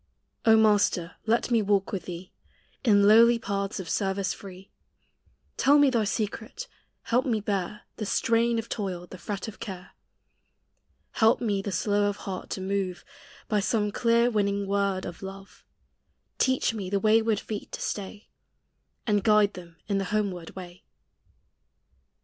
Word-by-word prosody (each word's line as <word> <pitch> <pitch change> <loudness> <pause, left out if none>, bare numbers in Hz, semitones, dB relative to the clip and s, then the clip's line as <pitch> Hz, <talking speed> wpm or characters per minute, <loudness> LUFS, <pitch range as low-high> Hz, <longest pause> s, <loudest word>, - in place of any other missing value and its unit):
O 220 0 +7
Master, 205 -5 +2
lei 230 +2 +3
me 230 -2 +4
walk 200 -1 +1
with 190 -4 -4
thee 180 +1 -8 0.5
In 205 -4 +5
lowly 230 +2 +7
paths 200 -2 -3
of 185 - -6
service 195 +1 -1
free; 190 -1 -12 0.9
Tell 285 +2 +5
me 285 -2 +5
thy 230 -4 +1
secret; 220 - -4 0.4
help 245 +2 +1
me 235 -5 0
bear 205 0 -3
The 215 - -4
strain 230 +2 +2
of 225 0 -3
toil, 185 -5 -4
the 185 0 -11
fret 200 +3 -5
of 220 - -9
care; 185 -5 -8 1.2
Help 220 0 +3
me 205 -4 0
the 200 - -4
slow 205 +3 +1
of 200 - -4
heart 190 -2 -5
to 190 - -4
move 190 -2 -2 0.4
By 210 - +1
some 210 0 0
clear 235 +2 +2
winning 200 -2 0
word 200 -1 0
of 170 - -8
love; 195 0 -10 0.8
Teach 260 -3 +2
me 200 -4 -5
the 200 +1 +1
wayward 220 0 +3
feet 210 0 -6
to - - -4
stay, 205 +1 -5 0.8
And 205 -4 +1
guide 210 -1 +4
them 170 -2 -11
in 200 -2 0
the 195 - -2
homeward 190 -4 -2
way. 180 -1 -10
205 Hz, 155 wpm, -27 LUFS, 195-220 Hz, 1.2 s, O